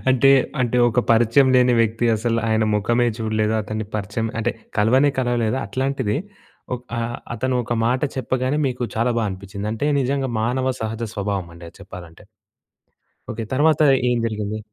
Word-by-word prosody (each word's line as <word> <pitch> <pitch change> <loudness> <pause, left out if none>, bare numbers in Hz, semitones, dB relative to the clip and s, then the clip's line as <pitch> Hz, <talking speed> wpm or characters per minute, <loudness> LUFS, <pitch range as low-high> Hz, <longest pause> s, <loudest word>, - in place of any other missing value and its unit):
అంటే, 135 +1 +5 0.3
అంటే 120 0 +1
ఒక 120 +1 +2
పరిచయం 120 +4 +4
లేని 125 -1 +4
వ్యక్తి. 115 +1 0
అసల 115 +1 -1
ఆయన 110 0 +2
మొఖమే 120 +4 +2
చూడలేదు. 110 0 0
అతన్ని 110 +1 -4
పరిచయం 105 +2 -3
అంటే 120 +2 0 0.3
కలవనే 130 +7 +4
కలవలేదు. 120 -1 0
అట్లాంటిది 130 -2 -1 0.6
ఒక్ 125 0 -8
ఆ - - 0 0.3
అతను 130 +3 -1
ఒక 120 - -3
మాట 125 +2 +1 0.2
చెప్పగానే, 130 +2 -1
మీకు 125 - -5
చాలా 120 +2 +1
బా 110 - 0
అనిపిచ్చింది. 100 +2 -7
అంటే 130 +6 -2
నిజంగా 135 0 -1
మానవ 130 +3 0
సహజ 110 +1 -4
స్వభావం 100 -3 -2
అండి 85 0 -11
అది - - -17
చెప్పాలంటే. 85 -2 -11 1.1
ఓకే. 115 +1 -4
తర్వాత 150 +3 +3 0.3
ఏం 120 - +1
జరిగింది? 110 -1 -3
115 Hz, 155 wpm, -21 LUFS, 110-130 Hz, 1.1 s, అంటే